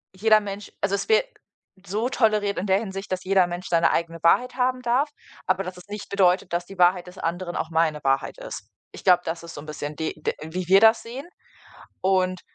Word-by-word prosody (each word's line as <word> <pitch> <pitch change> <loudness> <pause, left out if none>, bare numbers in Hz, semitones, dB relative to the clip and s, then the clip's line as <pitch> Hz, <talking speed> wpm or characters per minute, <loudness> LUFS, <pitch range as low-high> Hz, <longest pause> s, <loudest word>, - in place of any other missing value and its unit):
jeder 215 +2 +5
Mensch 205 0 -7
also 200 0 +1
es 310 - -4
wäre 445 +3 +4 0.6
so 215 +6 -1
toleriert 215 -5 +1
in 190 - -2
der 190 +1 +3
Hinsicht, 195 -2 -6
dass 185 0 -3
jeder 190 -1 +4
Mensch 175 +1 -6
seine 170 -1 +3
eigene 165 0 -2
Wahrheit 245 +9 +3
haben 255 0 0
darf, 250 +5 +1 0.4
aber 185 +1 +1
dass 185 0 -7
es 180 - -14
nicht 210 -1 -6
bedeutet, 185 -3 +2
dass 175 0 -1
die 195 - -12
Wahrheit 180 0 +3
des 180 +1 -12
anderen 175 +1 -3
auch 160 - -3
meine 160 -2 +1
Wahrheit 135 - 0
ist. - - -8 0.2
Ich - - -11
glaube, 180 -2 +5
das 165 +1 -4
ist 170 - -9
so 145 - -7
'n 155 - -12
bisschen 150 0 -6
die 160 - -2
d - - 0
wie 175 +2 -5
wir 195 +1 +8
das 225 +1 +5
sehen 255 +6 -8 0.8
und 185 -1 +1
185 Hz, 220 wpm, -24 LUFS, 175-210 Hz, 0.8 s, wir